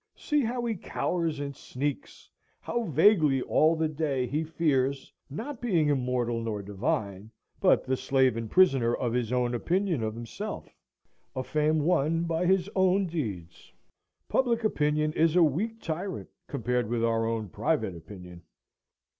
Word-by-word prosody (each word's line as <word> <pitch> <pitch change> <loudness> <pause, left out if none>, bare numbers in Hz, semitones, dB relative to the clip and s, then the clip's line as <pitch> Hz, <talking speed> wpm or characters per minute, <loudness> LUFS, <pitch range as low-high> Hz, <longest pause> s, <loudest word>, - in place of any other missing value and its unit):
See 295 -1 0
how 240 0 -2
he 230 - 0
cowers 170 -5 -2
and 140 -1 -5
sneaks, 140 +3 -5 0.3
how 235 -1 -2
vaguely 155 -5 +4
all 160 +2 +3
the 160 0 0
day 145 -4 -1
he 145 +6 -1
fears, 140 -4 0 0.2
not 230 - -6
being 175 -11 +2
immortal 125 -4 0
nor 110 -3 -3
divine, 100 0 -3 0.3
but - - +4
the 130 0 0
slave 130 -2 +2
and 115 -1 -4
prisoner 135 -11 +4
of 120 -2 -2
his 120 -2 -1
own 125 -1 +1
opinion 175 - 0
of 110 0 -2
himself, 115 0 -7 0.6
a 130 - -2
fame 155 +3 +1
won 165 0 +1
by 170 +1 0
his 190 0 +2
own 190 +1 +3
deeds. 105 - -5 0.6
Public 235 -3 +1
opinion 150 -6 +1
is 160 +1 +2
a 180 - +6
weak 205 +10 0
tyrant 175 +3 -4 0.2
compared 125 -4 -1
with 120 -1 -1
our 115 -1 +1
own 110 -3 -2
private 90 +2 -1
opinion. 90 +1 -11
145 Hz, 150 wpm, -28 LUFS, 120-170 Hz, 0.6 s, a